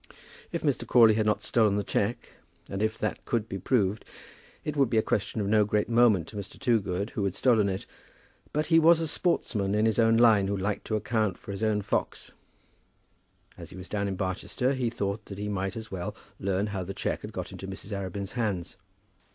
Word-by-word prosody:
If - - -3
Mr. - - 0
Crawley 115 -3 +7
had 110 0 +1
not 105 0 +1
stolen 110 -4 +3
the 105 - 0
cheque, 100 +4 -1 0.4
and 95 - -4
if 110 0 0
that 110 - -3
could 115 -2 -1
be 95 - -5
proved, 105 -1 +1 0.6
it 150 - -2
would 135 -4 +3
be 115 - +1
a 110 - +4
question 105 +2 -1
of 105 - 0
no 105 +1 +4
great 105 0 0
moment 115 -7 +4
to - - -12
Mr. 100 -1 -7
Toogood 100 -4 0
who 105 - -2
had 100 -2 -1
stolen 110 -6 +3
it. 95 0 -4 0.7
But 150 +1 0
he 165 0 +5
was 165 +1 +6
a 165 - -1
sportsman 110 - 0
in 105 +1 +3
his 110 0 +2
own 115 0 +5
line 110 -4 +5
who 100 0 -1
liked 100 +2 -2
to 110 - 0
account 110 -2 0
for - - -9
his 100 +1 -5
own 105 -2 +1
fox. - - -2 1.3
As - - -9
he - - -11
was 90 0 -9
down 100 -1 -1
at 95 -1 -3
Barchester, 100 +7 -1
he 130 -3 0
thought 100 -1 -3
that 100 - -8
he 105 +1 -3
might 95 +2 -2
as 110 -1 -8
well 90 -2 -4 0.2
learn 95 +1 0
how 95 -2 -2
the 100 +2 -6
cheque - - -2
had - - -7
got - - -5
into 95 - -8
Mrs. 95 +2 -8
Arabin's 100 0 -4
hands. 105 -8 -2
105 Hz, 215 wpm, -28 LUFS, 100-115 Hz, 1.3 s, Crawley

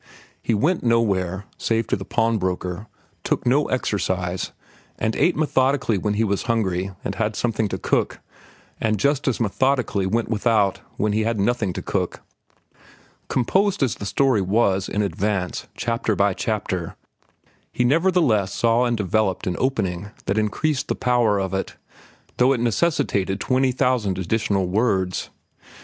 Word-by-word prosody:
He 115 - 0
went 165 - +1
nowhere, 100 -5 +1
save 115 0 0
to - - +2
the 95 - -6
pawnbroker, 105 -4 -1 0.4
took - - -1
no 135 +4 +3
exercise, 95 -7 -1 0.5
and 110 0 -1
ate 175 - +3
methodically 130 -7 +1
when 105 +2 -1
he 110 - +2
was 100 -2 0
hungry 95 -5 0 0.2
and 100 - -1
had 110 +1 -1
something 110 -2 0
to 95 - -3
cook, - - 0 0.6
and 110 -1 +1
just 140 +7 +1
as 130 - +1
methodically 115 -3 +1
went 115 +4 0
without 105 -3 +2 0.2
when 105 0 +1
he 110 - +1
had 110 -1 0
nothing 105 -1 +1
to - - -5
cook. - - -2 1.1
Composed 190 - +1
as 130 - +1
the 100 - -6
story 130 0 +2
was, 95 -1 +1
in 105 - 0
advance, 95 0 -2
chapter 115 -2 -1
by 100 0 +2
chapter, 95 -4 -3 0.8
he 125 - 0
nevertheless 145 - +3
saw 115 +1 +3
and 120 -1 0
developed 105 -1 0
an 90 - -1
opening 100 -8 -1 0.2
that 100 +2 +1
increased 130 +6 0
the - - -1
power 120 -4 +2
of 95 -1 -2
it, 95 - -3 0.6
though 125 +2 +4
it 125 - -1
necessitated 115 - 0
twenty 130 0 +2
thousand 125 -7 +1
additional 100 +1 0
words. 95 -2 0
110 Hz, 150 wpm, -23 LUFS, 95-125 Hz, 1.1 s, though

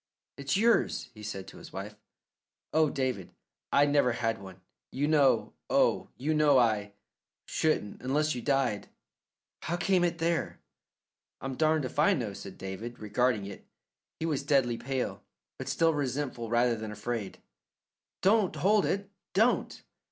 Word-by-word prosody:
"It's 140 +4 -1
yours," 225 - +2
he 105 - -12
said 100 -2 -6
to - - -13
his - - -12
wife. 100 +2 -6 0.8
"Oh, 155 -1 +4
David, 130 -9 -3 0.4
I 145 - +5
never 145 -4 +3
had 115 -3 -1
one. 95 -1 -11 0.3
You 140 +3 0
know, 145 -3 +3 0.2
oh, - - +2
you 150 +5 0
know 150 -3 +5
I 105 -4 +2 0.5
shouldn't 155 -10 -1
unless 150 +4 +1
you 125 - -4
died. 135 -6 0 0.7
How 175 - -2
came 185 0 +2
it 170 -1 +1
there?" 170 0 -1 0.8
"I'm 135 0 -4
darned 155 +1 +2
if 130 - -5
I 150 - +5
know," 110 -6 -3
said 95 -1 -9
David, 105 +5 -6
regarding 110 0 0
it. 100 - -9 0.6
He 160 - -2
was 150 -4 0
deadly 135 -4 +2
pale, 135 -1 -3 0.4
but - - -5
still 165 -1 +3
resentful 130 -4 -2
rather 120 +1 +3
than 110 -1 -6
afraid. 105 0 -4 0.9
"Don't 200 0 +3
hold 205 +2 +3
it; 200 0 -1 0.3
don't!" 225 +5 +2
135 Hz, 150 wpm, -30 LUFS, 115-155 Hz, 0.9 s, I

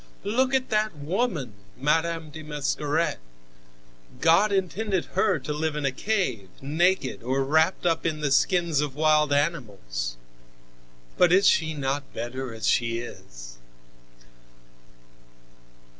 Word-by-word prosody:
"Look 255 +6 +1
at 260 -1 0
that 215 -3 +1
woman, 155 - -2 0.2
Madame 160 +3 0
de 160 - -8
Mascaret. 150 +1 -1 1.0
God 170 +6 +4
intended 195 0 -1
her 190 -1 +2
to 150 +1 -4
live 155 0 -2
in 150 -1 -2
a 140 - +2
cave, 130 - -2
naked 155 +1 0
or 130 +3 0
wrapped 160 +7 +2
up 165 -2 +1
in 155 -2 -1
the 150 -2 -1
skins 170 +1 +2
of 145 -3 -3
wild 150 -1 +3
animals. 100 - -2 1.0
But 175 -1 +5
is 190 +2 +5
she 160 0 +2
not 140 0 -3
better 125 +2 -4
as 110 0 -4
she 115 -1 +2
is? - - -9
150 Hz, 125 wpm, -26 LUFS, 135-175 Hz, 1.0 s, But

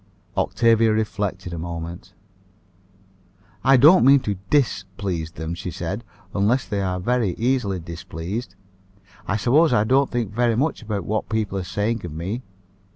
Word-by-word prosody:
Octavia 115 -1 +3
reflected 100 -4 -2
a 85 - -4
moment. 85 +1 -6 1.5
"I 135 0 +6
don't 155 +8 +7
mean 140 +2 +7
to 105 -5 -2
_dis_please 95 - -1
them," 80 -1 -5
she 90 +2 -5
said, 90 +6 -4 0.3
"unless 110 +6 +1
they 100 -3 -1
are 90 -1 -1
very 110 -2 0
easily 115 -6 0
displeased. 90 +4 -6 0.7
I 105 - 0
suppose 140 - +4
I 105 - +4
don't 135 +5 +3
think 115 -5 -2
very 120 0 +2
much 140 +5 0
about 105 -5 -3
what 110 +1 -2
people 110 -3 -1
are - - -4
saying 105 +5 -2
of 85 -4 -6
me. 95 +10 -4
105 Hz, 150 wpm, -23 LUFS, 90-120 Hz, 1.5 s, don't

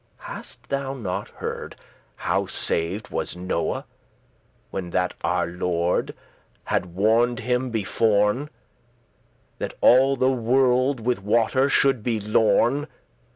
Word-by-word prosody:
Hast - - -10
thou 135 -1 -2
not 100 -8 -4
heard - - -6 0.4
how - - -1
saved 90 +6 -2
was - - -3
Noe, 90 -2 -2 0.9
When 90 -2 -4
that 90 +1 0
our - - +1
Lord 85 0 -1 0.5
had 90 -1 -2
warned 115 +5 +2
him 125 +2 0
beforn, 110 +4 +1 1.1
That - - -4
all 135 +2 +5
the 130 0 +2
world 130 +1 +2
with 120 -2 0
water 115 +6 +2
*should 135 -4 +3
be 115 0 -1
lorn*?" 110 +7 +2
115 Hz, 110 wpm, -24 LUFS, 95-130 Hz, 1.1 s, all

